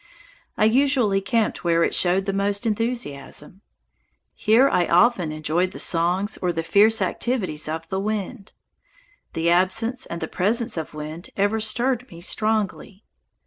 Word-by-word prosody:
I - - +3
usually 240 -4 +2
camped 225 +2 -1
where 170 -1 +2
it - - 0
showed 185 +2 +2
the 195 - -2
most 200 +2 -1
enthusiasm. 210 - -4 0.7
Here 225 +5 +3
I 175 -9 +1
often 180 -3 +3
enjoyed 155 +4 -1
the - - -8
songs 180 +5 +2
or 180 -1 0
the 165 -1 -3
fierce 215 +5 +4
activities 185 - -2
of 160 +1 -5
the 190 - -2
wind. 210 +1 -4 0.8
The 165 +1 0
absence 205 +8 +1
and 170 - -6
the 160 - -4
presence 220 +8 -1
of 160 -2 -6
wind 155 +3 -8
ever 205 +2 +1
stirred 245 +3 0
me 170 - -12
strongly. 210 +1 -2
195 Hz, 145 wpm, -23 LUFS, 170-225 Hz, 0.8 s, fierce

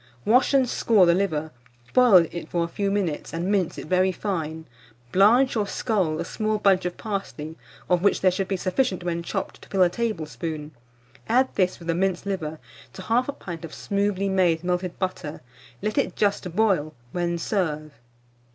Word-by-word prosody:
Wash 250 +4 +4
and 265 -2 +4
score 220 -5 +4
the 170 - +5
liver, 160 -5 -1 0.4
boil 220 -9 +7
it 170 - -6
for 170 -1 0
a - - -2
few 200 +3 -2
minutes, 195 -7 -2
and 175 +4 -1
mince 190 -5 0
it - - -6
very 185 +3 +2
fine; 160 -5 -4 0.5
blanch 235 +8 +5
or 210 -2 0
scald 190 -10 0
a 170 - -2
small 215 +3 -1
bunch 195 -3 +3
of 180 - -3
parsley, 195 -7 -5 0.3
of 180 -1 +2
which 200 - +2
there 185 - +5
should 190 +1 -2
be 195 - -1
sufficient 185 0 0
when 170 -1 -2
chopped 170 - -4
to - - -15
fill 190 -2 +3
a 180 - +4
tablespoon; 160 - -4 0.6
add 255 +3 +3
this, 185 -1 +1
with 170 - -12
the 165 - +2
minced 185 +1 0
liver, 160 -6 -3 0.4
to 190 - -8
1/2 250 +7 0
pint 170 -3 -7
of 165 - -8
smoothly 200 -1 -1
made 180 -4 +2
melted 180 0 -2
butter; 185 -5 -4 0.4
let 215 - 0
it - - -1
just 200 -4 0
boil; 185 -8 +2 0.2
when 175 -1 -1
serve. 155 -5 -2
185 Hz, 180 wpm, -25 LUFS, 170-205 Hz, 0.6 s, boil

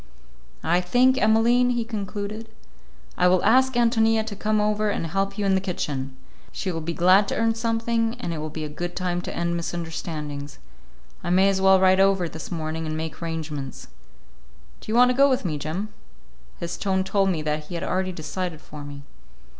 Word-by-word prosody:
"I 175 +2 +2
think, 250 +8 +3
Emmaline," 235 +3 +4
he 240 -2 0
concluded, 215 0 -5 0.7
"I - - +5
will 180 0 +3
ask 260 +2 +4
Ántonia 225 -2 +3
to 215 -2 -6
come 215 +1 0
over 210 0 +1
and 200 - -2
help 195 +4 -2
you 205 - -1
in 195 - +3
the 190 - +2
kitchen. 140 -8 -4 0.3
She 190 - -3
will 165 -1 -4
be 165 +2 -3
glad 185 +3 +5
to - - -2
earn 225 0 +2
something, 230 0 0
and 175 -8 -3
it 160 - -4
will 155 +1 -4
be 155 +1 -6
a - - -3
good 175 +4 -5
time 175 -1 -1
to - - -6
end 170 0 0
misunderstandings. 160 -4 -5 0.7
I - - -3
may 190 +2 +4
as 190 -1 0
well 190 0 +6
ride 190 0 +4
over 195 -2 +3
this 160 +2 -8
morning 160 -1 -3
and 155 0 -3
make 160 +1 -5
arrangements. 155 -5 -5 0.9
Do - - -7
you - - 0
want 250 +1 +6
to - - -1
go 280 +2 +5
with 255 -6 0
me, 155 -4 -2
Jim?" 175 +9 -3 0.7
His 170 0 -4
tone 190 -1 0
told 195 0 +1
me 165 -4 -1
that 150 0 -2
he 175 - -7
had 170 - -3
already 185 0 -1
decided 170 0 -4
for 150 -1 -10
me. 145 0 -9
185 Hz, 200 wpm, -24 LUFS, 160-215 Hz, 0.9 s, well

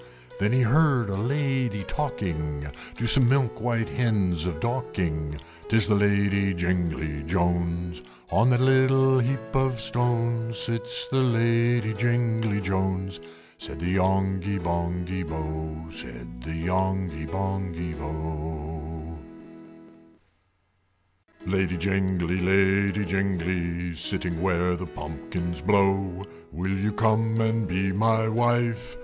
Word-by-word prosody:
There 100 +1 +2
he 130 +3 +3
heard 130 -2 +3
a 95 - -2
Lady 125 -2 0
talking, 80 - -3 0.3
To 120 - -2
some 120 +1 +7
milk 130 -5 +1
white 115 -2 0
Hens 95 - 0
of 80 -2 -3
Dorking, 80 - -2 0.3
"'Tis 110 -1 +4
the 105 - +2
Lady 100 -1 +2
Jingly 85 -4 -1
Jones! 85 -2 -1 0.3
On 115 +5 +4
that 125 0 +3
little 130 0 +4
heap 120 -3 -2
of 130 -3 +1
stones 120 +1 0
Sits 125 +8 0
the 135 0 +2
Lady 115 -2 +2
Jingly 115 -2 +1
Jones!" 95 -1 -1 0.4
Said - - -4
the 85 +2 -2
Yonghy 95 +1 +1
Bonghy 90 +1 -2
Bò, 80 0 -5
Said - - -6
the 80 +6 -5
Yonghy 95 -3 -1
Bonghy 95 -2 -3
Bò. 80 +1 -6 2.3
III. 90 - -3
"Lady 95 -2 +1
Jingly! 95 -1 0
Lady 95 +2 +3
Jingly! 90 -2 -1
Sitting 85 +1 0
where 90 -1 +1
the 90 +1 -5
pumpkins 80 +3 -5
blow, 95 -2 +2 0.3
Will 95 +5 -2
you 100 +2 0
come 110 +1 +2
and 110 -1 +1
be 95 +2 0
my 110 +3 +2
wife?" 120 +1 0
95 Hz, 115 wpm, -26 LUFS, 85-115 Hz, 2.3 s, some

